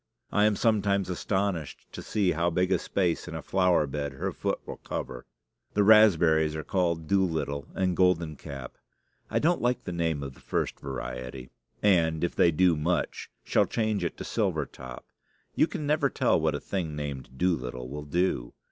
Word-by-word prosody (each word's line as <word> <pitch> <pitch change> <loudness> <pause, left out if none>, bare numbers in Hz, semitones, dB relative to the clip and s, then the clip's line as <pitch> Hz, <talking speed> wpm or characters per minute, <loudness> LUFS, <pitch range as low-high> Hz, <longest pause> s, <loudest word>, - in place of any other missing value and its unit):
I 105 - +3
am 105 -1 +3
sometimes 100 -4 +1
astonished 95 -4 -2
to - - -7
see 100 -4 +1
how 85 +2 +1
big 90 +2 0
a 95 - +3
space 90 -4 -1
in 85 - -6
a 80 - -5
flower 90 -4 +3
bed 70 0 -4
her 65 - -3
foot - - -2
will - - -7
cover. 60 -2 -6 0.5
The 105 - +4
raspberries 85 -8 +5
are 80 - -4
called 85 -4 0
Doolittle 80 -7 0
and 95 -2 +1
Golden 85 -4 +2
Cap. 70 -5 -9 0.5
I - - 0
don't 170 +3 +2
like 120 +1 0
the - - -5
name 80 -4 -1
of 70 -1 -6
the - - -18
first - - -2
variety, 65 -1 -6 0.3
and, 85 -6 +3
if 85 - -1
they 85 - +5
do 85 +1 +3
much, 85 +4 -1
shall - - +2
change 110 -4 0
it 85 - -3
to - - -6
Silver - - 0
Top. 65 -1 -10 0.5
You - - +3
can 170 -6 -5
never 145 -1 +2
tell - - +2
what - - +1
a - - -2
thing 85 -6 -3
named 70 -3 -6
Doolittle 65 -8 -1
will 75 +3 -6
do. 75 -6 0
85 Hz, 185 wpm, -28 LUFS, 75-95 Hz, 0.5 s, raspberries